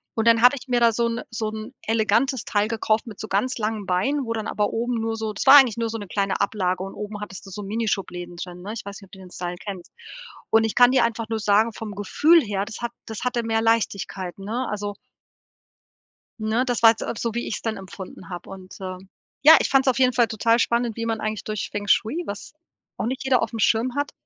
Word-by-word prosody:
und 225 0 0
dann 230 -1 +5
habe 250 +3 +7
ich 250 - -15
mir 245 -1 +2
da 235 -1 +6
so 235 +2 +1
'n 230 +1 -3
so 220 -1 -2
'n 220 +3 -7
elegantes 225 +4 +1
Teil 205 0 +1
gekauft 220 0 0
mit 215 -3 -9
so 220 - -5
ganz 230 +7 0
langen 215 -2 -2
Beinen, 265 +10 0
wo 230 - -2
dann 220 -1 -3
aber 210 -1 0
oben 240 +2 -1
nur 225 0 -2
so 220 -1 -3
das 210 - -4
war 270 - +11
eigentlich 255 -6 +5
nur 230 -1 -1
so 225 - -4
'ne 205 -2 -8
kleine 195 +1 -1
Ablage 185 -3 0
und 195 - -7
oben 210 0 -6
hattest 195 -2 -8
du - - -10
so 205 +2 -6
Mini-Schubläden 195 -4 -3
drin, 180 0 -7
ne? 205 +4 -6
Ich 225 - -6
weiß 200 -1 -7
nicht, 195 - -14
ob - - -38
du 190 - -11
den 185 -1 -13
Style 175 0 -5
kennst. 195 -4 -8 0.6
Und 225 0 +5
ich 220 - -2
kann 245 0 +7
dir 255 -3 +4
einfach 230 -1 -3
nur 225 -1 -1
sagen 215 +2 +3
vom 210 -2 -7
Gefühl 305 - +4
her, 205 -5 -2
das 225 +2 -8
hat 235 0 -3 0.2
das 220 -1 -6
hatte 245 -1 0
mehr 225 0 0
Leichtigkeit, 200 -5 -1
ne? 225 +6 -3
Also 205 -1 -4 1.4
ne, 220 +3 0
das 245 -2 -1
war 225 - +9
jetzt 225 - -3
auch - - -4
so, 230 0 -3
wie 235 - -2
ich's - - -4
dann 225 -1 -2
empfunden 190 -1 -10
habe 175 -2 -8
und 190 -1 -10
äh, 185 -1 -5 0.5
ja, 320 +2 +10
ich - - 0
fand's 270 0 +3
auf 260 - +2
jeden 255 -1 +4
Fall 240 -2 +3
total 230 +1 +2
spannend, 235 -1 0
wie 230 - -3
man 225 -1 -1
eigentlich 215 -1 -3
durch 215 -1 -3
Feng 205 0 -5
Shui, 235 - +2
was 200 0 -7 0.4
auch - - -3
nicht 260 +3 -3
jeder 260 -2 +3
aufm 225 0 -3
Schirm 230 +3 +2
hat, 285 0 -1
220 Hz, 245 wpm, -23 LUFS, 205-235 Hz, 1.4 s, war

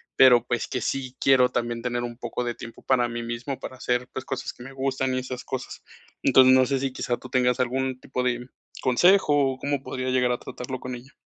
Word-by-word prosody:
pero 125 -2 +7
pues 120 -2 -1
que 130 - -2
sí 130 0 -3
quiero 130 -2 +5
también 120 -1 -2
tener 120 0 -2
un 120 -1 -6
poco 120 +1 -3
de 120 -1 -2
tiempo 115 0 -11
para 125 -2 +2
mí 120 0 -4
mismo, 120 +3 -4
para 130 - -8
hacer 125 0 -1
pues 130 - -4
cosas 135 0 -4
que - - -16
me 135 +1 -10
gustan 130 -1 -1
y - - 0
esas 130 0 -6
cosas. 130 -1 -6 0.4
Entonces 130 -1 +7
no 130 0 +6
sé 135 -1 +1
si 135 -1 -2
quizá 120 -2 -2
tú 130 - -11
tengas 125 -1 +2
algún 130 +1 -1
tipo 125 -1 -4
de 125 0 -1 0.3
consejo 145 -1 +4
o - - -10
cómo 140 -1 -1
podría 130 -1 -4
llegar 125 -1 +2
a 120 - 0
tratarlo 130 +1 -6
con 125 0 -6
ella. 130 +4 -13
130 Hz, 230 wpm, -25 LUFS, 120-130 Hz, 0.4 s, pero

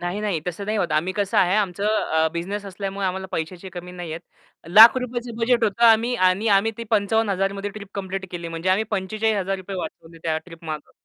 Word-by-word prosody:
नाही, 175 +4 -3
नाही 205 -6 -1
तसं 180 +3 -4
नाही 215 +1 -1
होत. 170 -5 -1
आम्ही 160 +5 +1
कसं 200 0 -1
आहे 180 +1 +4
आमचं 200 -2 -1
अ, 160 -7 +1
बिझनेस 195 +5 -4
असल्यामुळे 195 0 -4
आम्हाला 190 +1 -3
पैशाची 175 +3 -4
कमी 180 0 -8
नाहीये. 170 -3 -6 0.5
लाख 220 +8 +9
रुपयेच 245 -1 -4
बजेट 235 0 +2
होतं 220 +3 +1
आम्ही 230 +2 +4
आणि 185 +2 +2
आम्ही 220 +3 +1
ते 230 - -4
55,000 200 -2 +1
मध्ये 200 +1 -4
ट्रिप 200 -1 -10
कंप्लीट 195 -1 -4
केली 170 -1 -5
म्हणजे 165 +2 -4
आम्ही 200 +4 +2
₹45,000 195 -2 -1
वाचवले 165 -2 -8
त्या 160 -1 0
ट्रिप 165 -2 -14
मागं. 155 -1 -6
195 Hz, 195 wpm, -23 LUFS, 175-215 Hz, 0.5 s, लाख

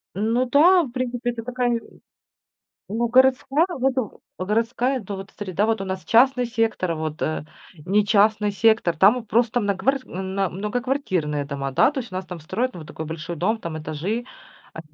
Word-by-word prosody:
Ну 225 +5 +1
да, 350 +7 +6
в 265 - -7
принципе, 245 -1 -2
это 230 -1 -7
такая, 250 +1 -1
не, 235 - +1
э - - -8 1.1
ну 230 +3 -1
городская, 265 +4 +4
вот 265 +1 +1 0.4
в 185 - -3
городская, 235 +5 0
ну, 200 - -3
вот 195 0 -9
среда, 200 0 -1
вот 225 -1 0
у - - -2
нас 190 -1 -5
частный 250 +2 +4
сектор, 225 -7 0
вот, 155 -1 -4
э, 155 -1 -2 0.4
не 205 +2 +3
частный 210 0 +3
сектор, 210 -4 +2
там 195 +7 +6
вот 240 -3 -6
просто 235 +1 +2
нагварс 205 +7 0
м, 190 +1 -6
на, 195 -2 0
многоквартирные 200 - -2
дома, 140 -1 -4
да. 135 - +4
То 280 - -2
есть 230 -6 -10
у - - -7
нас 185 0 -4
там 180 -2 -8
строят, 210 +11 -2
ну, 175 - -8
вот 155 - -11
такой 160 - -6
большой 160 +2 -6
дом, 215 +8 0
там 170 -6 -5
этажи. 160 +10 -3 0.5
А, - - -6
215 Hz, 195 wpm, -23 LUFS, 185-245 Hz, 1.1 s, да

